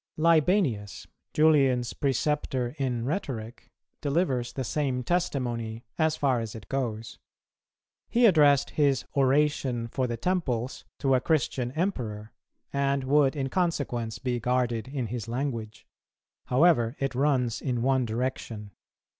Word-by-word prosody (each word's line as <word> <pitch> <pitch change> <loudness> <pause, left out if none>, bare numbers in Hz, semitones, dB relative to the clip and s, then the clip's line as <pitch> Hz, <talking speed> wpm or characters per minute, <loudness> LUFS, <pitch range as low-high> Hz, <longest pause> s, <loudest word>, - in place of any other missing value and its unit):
[241:1] 155 - -3
Libanius, 160 - +2 0.2
Julian's 135 -6 +3
preceptor 135 -2 -1
in 125 -4 -1
rhetoric, 125 - -4 0.3
delivers 140 -5 0
the 130 - -4
same 130 0 -1
testimony, 120 -9 -2
as 160 -1 +2
far 135 -5 +1
as 115 -1 -5
it 105 -5 -10
goes. 115 -5 -3 0.9
He 240 +1 +4
addressed 145 - +5
his 140 -3 +2
Oration 135 -3 +2
for 130 +2 -1
the 120 -1 -3
Temples 130 -6 -2
to 135 -1 +1
a 130 - +3
Christian 135 -6 0
Emperor, 115 - -3 0.4
and 140 -1 +1
would 140 +1 +3
in 135 -2 -2
consequence 130 -10 -1
be 125 +1 -2
guarded 120 -1 0
in 130 -2 -3
his 115 0 -5
language; 115 -3 -4 0.6
however 130 -3 +3
it 135 -1 -2
runs 130 -4 +1
in 125 -4 -1
one 130 0 +2
direction. 115 -3 -4
130 Hz, 130 wpm, -27 LUFS, 120-145 Hz, 0.9 s, addressed